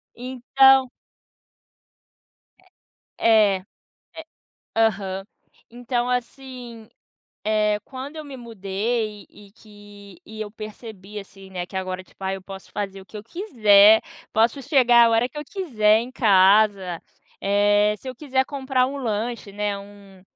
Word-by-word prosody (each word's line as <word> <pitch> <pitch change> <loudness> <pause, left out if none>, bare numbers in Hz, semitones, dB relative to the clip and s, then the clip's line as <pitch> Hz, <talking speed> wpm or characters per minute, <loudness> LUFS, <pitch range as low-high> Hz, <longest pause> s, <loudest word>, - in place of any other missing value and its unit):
Então 260 +1 +3 1.7
É 375 - -28 0.6
é, 215 -3 +5
é. 185 - -17 1.1
Aham. 195 -4 0 0.5
Então 245 +1 -2
assim, 250 -2 -5 0.6
eh, 210 -1 +1
quando 270 +3 -8
eu 310 - -7
me 280 -2 -9
mudei 215 -1 -3
e 200 -1 -17
que 205 -3 -16
e 220 0 -10
eu 210 -1 -5
percebi, 215 -2 -9
assim, 195 -1 -12
né, 180 -2 -4
que 190 - -9
agora, 185 0 -4
tipo, 195 - -20
"ai, 190 0 -1
eu 190 - -12
posso 195 0 -11
fazer 195 -2 -4
o 190 - -15
que 215 - -11
eu 210 - -7
quiser, 220 - +5 0.3
posso 225 +5 +2
chegar 245 -4 +5
a - - +2
hora 230 +2 +2
que 295 - -10
eu 295 - -5
quiser 230 - +2
em 240 +2 -7
casa". 195 -4 +3 0.4
Eh, 205 +1 +3
se 265 - -9
eu 255 - -6
quiser 265 -2 0
comprar 265 -2 0
um 275 +2 -5
lanche, 230 -3 -3
né, 205 0 -2
um 200 -1 -15
215 Hz, 140 wpm, -23 LUFS, 200-250 Hz, 1.7 s, é